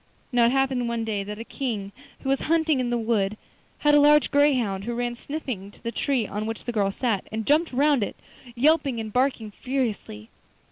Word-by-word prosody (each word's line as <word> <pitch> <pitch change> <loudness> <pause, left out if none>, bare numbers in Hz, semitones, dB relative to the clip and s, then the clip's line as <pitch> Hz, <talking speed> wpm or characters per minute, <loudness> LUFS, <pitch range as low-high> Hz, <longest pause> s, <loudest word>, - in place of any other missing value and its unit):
Now 240 -2 +4
it - - +2
happened 265 -2 +1
one 230 -1 -2
day 210 -3 -2
that 210 +1 -6
a 225 - -6
King 225 -7 -4 0.3
who 270 - -3
was 270 - +1
hunting 320 -3 +3
in 250 -1 -1
the 240 - 0
wood 215 -3 0 0.4
had 295 0 +3
a 295 - +7
large 295 -1 +5
greyhound, 250 -10 +2
who 240 0 -3
ran 240 0 -1
sniffing 240 -7 -6
to 205 - -20
the 230 - -2
tree 255 -2 0
on 210 +2 -4
which 225 0 -5
the 240 - -3
girl 200 -4 +1
sat, 220 -2 -1
and 220 0 -3
jumped 315 +3 +3
round 280 0 +3
it, 205 - -2 0.4
yelping 280 -1 +2
and 220 -1 -6
barking 250 -4 0
furiously. 220 - -3
240 Hz, 205 wpm, -25 LUFS, 215-275 Hz, 0.4 s, a